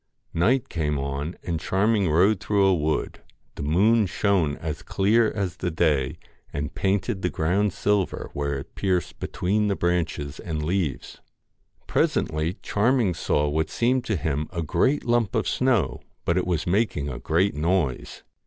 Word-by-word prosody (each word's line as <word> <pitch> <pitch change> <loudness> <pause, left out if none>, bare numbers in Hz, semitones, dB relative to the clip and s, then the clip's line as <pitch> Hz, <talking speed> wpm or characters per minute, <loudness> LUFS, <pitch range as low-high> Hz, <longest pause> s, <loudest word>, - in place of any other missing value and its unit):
Night 125 +10 +2
came 75 -3 -1
on, 70 +4 -3
and 85 -2 -2
Charming 100 +2 +1
rode 90 +6 +4
through 100 -2 +2
a 95 - +5
wood. 80 -2 -1 0.3
The - - -8
moon 100 +9 +3
shone 90 -6 +1
as 80 -1 -5
clear 110 +3 +2
as 95 -5 -3
the 90 - -2
day 75 -5 +1 0.3
and 70 0 -4
painted 95 0 0
the 90 - 0
ground 90 +7 +1
silver, 100 0 -1
where 70 0 -2
it 70 +4 -9
pierced 90 -5 -1
between 105 +4 0
the 100 - +1
branches 85 -6 -1
and 80 -2 -4
leaves. 85 -3 -2 0.6
Presently 80 +3 0
Charming 115 -2 +2
saw 75 -2 0
what 80 +2 0
seemed 125 +2 +1
to 110 - 0
him 75 -2 -1
a 85 -3 -3
great 130 - +1
lump 120 -3 +1
of - - +1
snow, 120 - +1 0.2
but 85 - +2
it 90 -1 0
was 85 -3 0
making 90 -6 0
a 65 -3 -5
great 85 +4 +1
noise. 80 -2 -1
90 Hz, 160 wpm, -25 LUFS, 75-100 Hz, 0.6 s, a